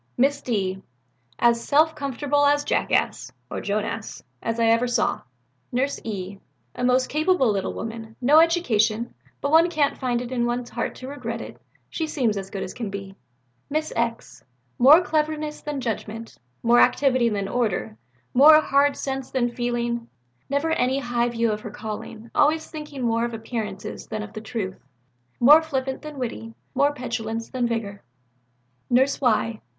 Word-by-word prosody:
"Miss 275 Hz, +3 st, +2 dB
D. 190 Hz, -5 st, -2 dB, 0.6 s
As 235 Hz, -1 st, +3 dB
self 310 Hz, +2 st, +3 dB
comfortable 285 Hz, 0 st, 0 dB
a 285 Hz, 0 st, +5 dB
jackass -, -, 0 dB, 0.2 s
(or -, -, -3 dB
Joan 205 Hz, +1 st, -1 dB
ass) 225 Hz, -1 st, -6 dB, 0.2 s
as 230 Hz, 0 st, -2 dB
ever 230 Hz, +1 st, +4 dB
I -, -, -2 dB
saw." 240 Hz, -2 st, 0 dB, 0.5 s
"Nurse 265 Hz, +3 st, 0 dB
E. 195 Hz, -2 st, -5 dB, 0.3 s
A -, -, -5 dB
most 255 Hz, +1 st, +3 dB
capable 310 Hz, -, +2 dB
little 195 Hz, -2 st, -2 dB
woman, 225 Hz, 0 st, -7 dB
no 280 Hz, +5 st, +6 dB
education, 235 Hz, -10 st, +2 dB, 0.3 s
but 280 Hz, -, -1 dB
one 330 Hz, +2 st, +6 dB
can't 305 Hz, -4 st, 0 dB
find 245 Hz, -3 st, 0 dB
it 245 Hz, 0 st, -6 dB
in 240 Hz, -2 st, 0 dB
one's 240 Hz, 0 st, -3 dB
heart -, -, -3 dB
to 255 Hz, -, -9 dB
regret 240 Hz, -5 st, -5 dB
it, -, -, -10 dB, 0.3 s
she 320 Hz, -, -3 dB
seems 250 Hz, -8 st, 0 dB
as 195 Hz, -1 st, -5 dB
good 195 Hz, -1 st, -4 dB
as -, -, -6 dB
can 230 Hz, -4 st, -5 dB
be." 195 Hz, -1 st, -7 dB, 0.5 s
"Miss 310 Hz, +2 st, -2 dB
X. 230 Hz, 0 st, -3 dB, 0.4 s
More 290 Hz, +7 st, +8 dB
cleverness 305 Hz, -2 st, -1 dB
than 295 Hz, -2 st, -4 dB
judgment, 225 Hz, -1 st, -5 dB, 0.2 s
more 235 Hz, +1 st, +5 dB
activity 255 Hz, -4 st, +4 dB
than 200 Hz, -2 st, -2 dB
order, 195 Hz, -, -1 dB, 0.4 s
more 305 Hz, +4 st, +8 dB
hard 285 Hz, -1 st, +2 dB
sense 270 Hz, -1 st, -4 dB
than 245 Hz, -2 st, 0 dB
feeling, 240 Hz, -1 st, -2 dB, 0.4 s
never 285 Hz, +4 st, 0 dB
any 260 Hz, -3 st, +1 dB
high 240 Hz, -2 st, 0 dB
view 230 Hz, -1 st, 0 dB
of 210 Hz, 0 st, -3 dB
her 215 Hz, -, -7 dB
calling, 220 Hz, +2 st, -7 dB
always 310 Hz, +2 st, +2 dB
thinking 300 Hz, -4 st, -7 dB
more 230 Hz, -1 st, +1 dB
of 235 Hz, -1 st, -2 dB
appearances 220 Hz, -3 st, -5 dB
than 215 Hz, -1 st, -4 dB
of 215 Hz, 0 st, -10 dB
the 215 Hz, -, -6 dB
truth, 215 Hz, -4 st, -5 dB, 0.6 s
more 295 Hz, +6 st, +8 dB
flippant 265 Hz, -4 st, -3 dB
than 305 Hz, -2 st, -8 dB
witty, 115 Hz, -, -5 dB, 0.2 s
more 285 Hz, +1 st, +3 dB
petulance 230 Hz, -4 st, -4 dB
than 250 Hz, -2 st, 0 dB
vigour." 210 Hz, -4 st, -3 dB, 0.9 s
"Nurse 265 Hz, +4 st, +2 dB
Y. 230 Hz, -3 st, +1 dB
240 Hz, 165 wpm, -24 LUFS, 225-280 Hz, 0.9 s, More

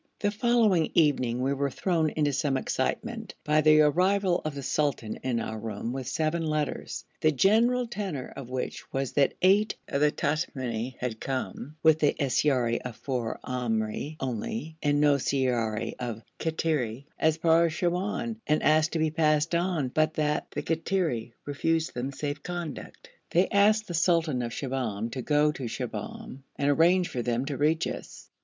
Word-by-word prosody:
The 205 Hz, -, 0 dB
following 215 Hz, -6 st, +3 dB
evening 130 Hz, -6 st, +2 dB
we 135 Hz, +1 st, +1 dB
were 140 Hz, 0 st, 0 dB
thrown 160 Hz, +3 st, 0 dB
into 150 Hz, -2 st, 0 dB
some 135 Hz, -1 st, +1 dB
excitement 225 Hz, -, -3 dB
by 150 Hz, +1 st, +3 dB
the 155 Hz, 0 st, +6 dB
arrival 180 Hz, +4 st, +3 dB
of 155 Hz, -2 st, -3 dB
the 140 Hz, -, -5 dB
sultan 135 Hz, -5 st, -1 dB
in 125 Hz, -3 st, -1 dB
our 110 Hz, -1 st, -4 dB
room 110 Hz, +2 st, -4 dB
with 130 Hz, -2 st, -5 dB
seven 160 Hz, +1 st, 0 dB
letters, 155 Hz, -2 st, -2 dB
the 155 Hz, -, +3 dB
general 230 Hz, -, +3 dB
tenor 195 Hz, -, -5 dB
of 130 Hz, -3 st, -8 dB
which 130 Hz, 0 st, -5 dB
was 135 Hz, -1 st, -2 dB
that 140 Hz, -2 st, +2 dB
eight 200 Hz, +3 st, +4 dB
of 140 Hz, -, -1 dB
the 150 Hz, -, +5 dB
Tamimi 130 Hz, -6 st, -2 dB
had 120 Hz, -3 st, -4 dB
come, 135 Hz, +2 st, -4 dB
with 160 Hz, -1 st, +5 dB
the 150 Hz, -, +3 dB
siyara 130 Hz, -3 st, +2 dB
of 125 Hz, -3 st, -6 dB
four 125 Hz, -4 st, -3 dB
Amri 120 Hz, +3 st, -2 dB
only, 130 Hz, +4 st, -4 dB
and 145 Hz, -1 st, +2 dB
no 145 Hz, -1 st, +4 dB
siyara 120 Hz, -5 st, 0 dB
of 115 Hz, -3 st, -4 dB, 0.2 s
Kattiri, 150 Hz, -7 st, -1 dB
as 160 Hz, 0 st, +3 dB
far 165 Hz, +1 st, +4 dB
as 160 Hz, -, -4 dB
Siwoun, 190 Hz, +7 st, -1 dB
and 150 Hz, +1 st, +2 dB
asked 155 Hz, 0 st, +3 dB
to -, -, 0 dB
be 155 Hz, -1 st, +1 dB
passed 155 Hz, 0 st, +2 dB
on, 170 Hz, -6 st, 0 dB
but 155 Hz, +4 st, +1 dB
that 150 Hz, -1 st, 0 dB
the -, -, -4 dB
Kattiri 160 Hz, -9 st, -1 dB
refused 160 Hz, +3 st, 0 dB
them 125 Hz, +3 st, -3 dB
safe 145 Hz, +1 st, -4 dB
conduct; 175 Hz, -5 st, -7 dB, 0.2 s
they 180 Hz, +3 st, +3 dB
asked 210 Hz, +2 st, +4 dB
the 175 Hz, -, -5 dB
sultan 165 Hz, -5 st, +2 dB
of 120 Hz, -1 st, -3 dB
Shibahm 120 Hz, -5 st, -3 dB
to 130 Hz, +1 st, -4 dB
go 150 Hz, +3 st, +3 dB
to 135 Hz, -4 st, -6 dB
Shibahm 180 Hz, -, -6 dB, 0.2 s
and 140 Hz, 0 st, 0 dB
arrange 175 Hz, +4 st, +4 dB
for 125 Hz, -, -3 dB
them 120 Hz, +2 st, -1 dB
to 140 Hz, 0 st, -3 dB
reach 155 Hz, +3 st, +2 dB
us. -, -, -7 dB
150 Hz, 170 wpm, -28 LUFS, 130-165 Hz, 0.2 s, the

